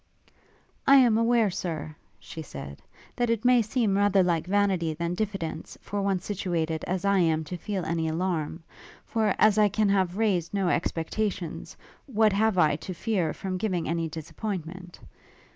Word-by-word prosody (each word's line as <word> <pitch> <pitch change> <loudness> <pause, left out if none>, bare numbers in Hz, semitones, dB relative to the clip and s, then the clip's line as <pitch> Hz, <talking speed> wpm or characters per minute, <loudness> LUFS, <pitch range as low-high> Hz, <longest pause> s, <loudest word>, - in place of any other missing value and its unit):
'I 275 - +8
am 245 -5 +6
aware, 230 -3 +3
Sir,' 155 -4 -4 0.2
she 160 - -9
said, 70 - -9 0.3
'that 240 -1 0
it 230 0 0
may 250 -1 +6
seem 220 -2 0
rather 200 -1 +4
like 170 -2 0
vanity 190 -5 +1
than 170 +2 -2
diffidence, 185 -5 -4
for 205 0 -4
one 195 -1 +1
situated 175 -5 -2
as 185 +1 -2
I 200 -1 +3
am 160 -2 +2
to 170 +4 -6
feel 190 0 -4
any 160 0 -1
alarm; 165 -1 -2 0.4
for 220 -7 0
as 215 0 +4
I 210 -1 +5
can 210 +1 +1
have 190 -2 +1
raised 195 -5 0
no 195 -3 +1
expectations, 175 +1 -2 0.3
what 220 -5 +3
have 215 0 +2
I 150 -4 +4
to 185 +3 -7
fear 180 -5 0
from 185 +2 -4
giving 185 -5 -1
any 165 0 -1
disappointment? 175 +2 -6
185 Hz, 160 wpm, -27 LUFS, 165-210 Hz, 0.4 s, I